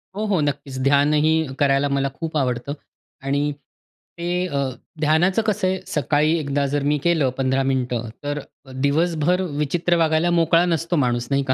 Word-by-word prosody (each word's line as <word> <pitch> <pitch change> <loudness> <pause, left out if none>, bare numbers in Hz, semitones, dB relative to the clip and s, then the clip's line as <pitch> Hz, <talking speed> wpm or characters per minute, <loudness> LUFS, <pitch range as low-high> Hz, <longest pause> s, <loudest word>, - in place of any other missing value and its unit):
हो, 215 +2 -2
हो. 200 -5 +1
नक्कीच 140 -2 -3
ध्यानही 150 +2 +2
करायला 140 0 +3
मला 140 0 0
खूप 160 +2 -4
आवडतं. 125 0 -1 0.5
आणि 140 +2 0 0.7
ते 175 +1 -1
अ, 145 - -3 0.4
ध्यानाचं 165 +7 +3
कसं 210 -3 0
आहे, 190 0 0
सकाळी 150 +3 +1
एकदा 140 -1 -1
जर 145 -1 0
मी 145 +1 +2
केलं, 160 -6 +2
15 135 0 +1
मिनिटं 125 -3 -1
तर 145 0 -2 0.4
दिवसभर 165 +4 +1 0.2
विचित्र 170 +4 +1
वागायला 160 +1 +2
मोकळा 165 0 +3
नसतो 170 0 0
माणूस 120 -5 0
नाही 140 0 +2
का? - - +4
150 Hz, 155 wpm, -22 LUFS, 140-170 Hz, 0.7 s, का